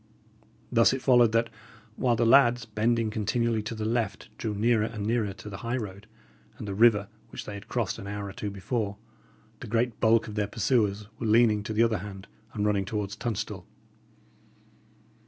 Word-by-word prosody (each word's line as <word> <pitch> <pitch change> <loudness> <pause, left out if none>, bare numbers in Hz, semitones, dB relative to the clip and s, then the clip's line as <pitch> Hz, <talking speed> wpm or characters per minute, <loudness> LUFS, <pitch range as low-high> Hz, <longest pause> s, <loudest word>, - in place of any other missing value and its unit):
Thus 115 0 +5
it 130 - -3
followed 120 -4 +5
that, 115 0 +1 0.4
while 120 -2 +2
the 115 +1 +1
lads, 120 -1 +5
bending 115 +1 0
continually 115 +1 0
to 110 +2 -5
the 110 -1 -4
left, 115 -2 -2
drew 110 -2 -2
nearer 110 +1 +2
and 110 -3 -5
nearer 110 -2 0
to 105 - -12
the 100 -2 -6
high 120 +4 -2
road 100 -2 -7 0.5
and 105 - -7
the 100 - -3
river 105 -1 +4 0.2
which - - -8
they 105 - -6
had 100 +1 -9
crossed 115 -3 -2
an 100 - -8
hour 100 0 -4
or 95 - -8
two 105 +1 -4
before, 100 +1 -3 0.6
the - - -8
great 115 +1 0
bulk 115 0 +3
of 105 - -7
their 105 -1 -1
pursuers 105 -1 0
were 115 - -2
leaning 110 -1 +4
to 105 - -6
the 110 +2 +4
other 115 -3 +1
hand, 95 0 -9 0.3
and 105 -1 -1
running 100 -2 +2
towards 105 0 -3
Tunstall. 105 -5 -4
110 Hz, 190 wpm, -27 LUFS, 105-115 Hz, 0.6 s, Thus